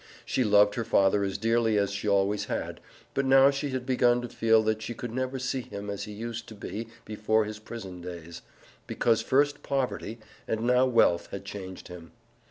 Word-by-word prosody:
She 130 - +1
loved 105 -1 +5
her 115 - -2
father 100 -2 +3
as 95 -1 -2
dearly 115 -1 +2
as 100 -1 +1
she 100 +1 -2
always 100 +1 +2
had, - - -4 0.3
but 135 - 0
now 135 +1 +6
she 140 +1 -3
had 130 -1 -3
begun 125 -2 +3
to 120 - -5
feel 115 -1 +3
that 110 0 0
she 120 +1 -5
could 120 0 -6
never 130 +2 -2
see 130 0 -2
him 100 -3 -7
as 100 0 -5
he 105 - -8
used 115 +2 -6
to 110 - -10
be 110 +2 -6 0.2
before 110 0 +1
his 105 0 -7
prison 100 -5 -8
days, 85 -1 -8 0.5
because 115 -2 +1
first 145 +2 +2
poverty 130 -5 -2 0.3
and 110 0 -1
now 125 +2 +3
wealth 115 -8 +3
had 100 0 -7
changed 95 -2 -8
him. 85 -2 -11
110 Hz, 195 wpm, -28 LUFS, 100-125 Hz, 0.5 s, now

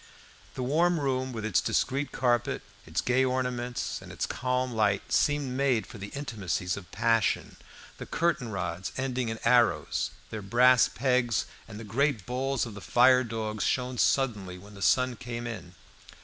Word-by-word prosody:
The 130 - -3
warm 165 +6 +2
room, 130 -2 -1
with 110 -3 -5
its 110 -5 +2
discreet 140 +2 0
carpet, 120 -2 0 0.2
its - - -1
gay 130 +1 +2
ornaments, 125 -1 -2
and - - -11
its - - -2
calm 125 0 -1
light, 105 -3 0
seemed 145 -3 +2
made 130 -6 +1
for 105 - -11
the 100 - -6
intimacies 100 -8 -3
of 100 -3 -10
passion. 115 0 +1 0.4
The - - -7
curtain 165 -8 0
rods, 95 -3 -4
ending 130 -3 -1
in 110 - -3
arrows, 120 0 +3 0.2
their 110 - -4
brass 120 +4 +5
pegs, 125 -3 +1 0.2
and 110 -1 -9
the - - -7
great 115 +1 0
balls 130 +1 -1
of 115 - -8
the 105 - -9
fire 125 +3 +5
dogs 110 -3 -3
shone 125 -1 -1
suddenly 105 -9 +1
when 100 +3 -14
the 100 - -11
sun 125 +2 +3
came 120 0 -6
in. 110 -6 -7
120 Hz, 165 wpm, -28 LUFS, 110-130 Hz, 0.4 s, brass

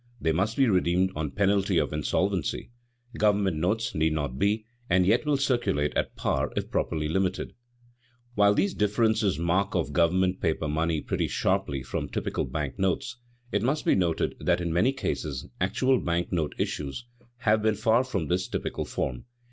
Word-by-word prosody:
They 80 - +1
must 100 +7 0
be 135 -2 +4
redeemed 90 -2 +2
on 75 -1 -2
penalty 100 +2 +1
of - - +1
insolvency; 90 - -1 0.5
government 100 -5 +2
notes 105 +8 0
need 80 0 +1
not 70 -4 -3
be, 105 +2 +1 0.2
and 90 0 +4
yet 115 +9 +2
will 145 -2 +3
circulate 120 - 0
at - - -1
par - - -1
if - - -3
properly 75 -2 -1
limited. 95 +3 -1 0.8
While 105 -2 +4
these 195 - +1
differences 105 -2 +1
mark 95 +5 0
off 85 -5 0
government 90 +4 +2
paper 80 -1 0
money 80 +1 0
pretty - - -1
sharply 70 -2 0
from 65 - -4
typical - - -2
bank 70 +5 -4
notes, 95 +6 -1 0.3
it 105 - +1
must 140 +7 0
be - - +4
noted 85 -3 +1
that - - +1
in 85 -2 -2
many 105 +10 +3
cases 75 - -3
actual 125 +8 +2
bank 85 +1 -1
note 80 -4 -1
issues 75 - -3 0.3
have 110 -3 +2
been 110 0 +2
far 110 +3 +3
from 100 -10 -2
this 90 +3 0
typical - - -3
form. 60 -2 -3
95 Hz, 170 wpm, -27 LUFS, 80-110 Hz, 0.8 s, be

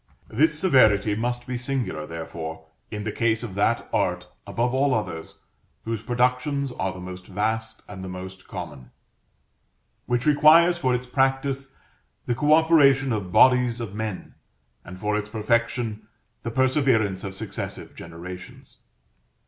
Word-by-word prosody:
This 150 +6 +2
severity 110 - +4
must 120 +3 -2
be 125 -1 -4
singular, 120 - -3
therefore, 80 -1 -7 0.2
in 105 -1 -5
the 105 - -2
case 110 +1 0
of 110 -5 -6
that 105 +4 +1
art, - - 0 0.2
above 120 +1 -1
all 135 0 +2
others, 90 -7 -4 0.5
whose 115 -2 -3
productions 125 +3 0
are 95 -5 -2
the 95 - -9
most 90 0 -8
vast 110 +3 -2
and 95 -2 -8
the 95 - -6
most 95 +1 -8
common; 65 - -8 1.2
which 120 0 0
requires 160 +4 +6
for 130 -5 +2
its 125 +1 -3
practice 135 +1 0 0.6
the 120 - 0
co 150 +5 +1
operation 145 -5 +5
of 100 -4 -3
bodies 125 +1 +5
of 115 -5 -5
men, 110 -2 -5 0.5
and 90 +1 -10
for 105 +2 0
its 105 0 -2
perfection 115 0 -1 0.3
the 115 - -4
perseverance 130 -6 +2
of 95 -1 -6
successive - - -6
generations. 85 +2 -10
115 Hz, 140 wpm, -24 LUFS, 100-130 Hz, 1.2 s, requires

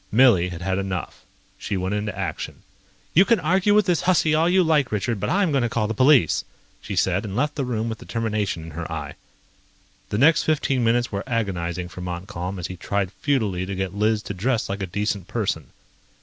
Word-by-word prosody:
Millie 105 -7 +5
had 85 -1 -7
had 95 0 0
enough. 95 -2 -5 0.3
She 100 - -3
went 95 +2 -2
into 105 -2 -3
action. 95 -5 -5 0.5
"You 180 - +7
can 230 +2 +3
argue 185 +5 +2
with 210 -2 +5
this 180 -3 +1
hussy 175 -4 +3
all 160 +2 +3
you 185 +1 +4
like, 150 -5 +2
Richard, 110 +1 -1
but - - -2
I'm 190 -3 +2
going 135 -2 +2
to 120 - 0
call 110 -1 0
the 110 - -2
police," 130 - +4 0.4
she 100 - -5
said, 95 +1 +1
and 100 -3 -5
left 145 +5 0
the 145 - -2
room 115 -2 -2
with 110 -1 -4
determination 105 -7 -2
in 80 - -9
her 85 +2 -6
eye. 75 -3 -5 1.0
The - - -1
next 150 +6 +5
fifteen 140 -5 +1
minutes 120 +1 +2
were 100 -1 -3
agonizing 90 -7 -2
for 90 - -9
Montcalm 90 +1 -5
as 90 - -5
he 95 - -6
tried 100 0 -2
futilely 110 -12 0
to 100 - -3
get 95 -1 -3
Liz 105 +1 +1
to - - -5
dress 115 +5 -1
like 100 +1 -3
a 95 - -2
decent 100 0 -2
person. 95 - -2
105 Hz, 210 wpm, -23 LUFS, 95-130 Hz, 1.0 s, You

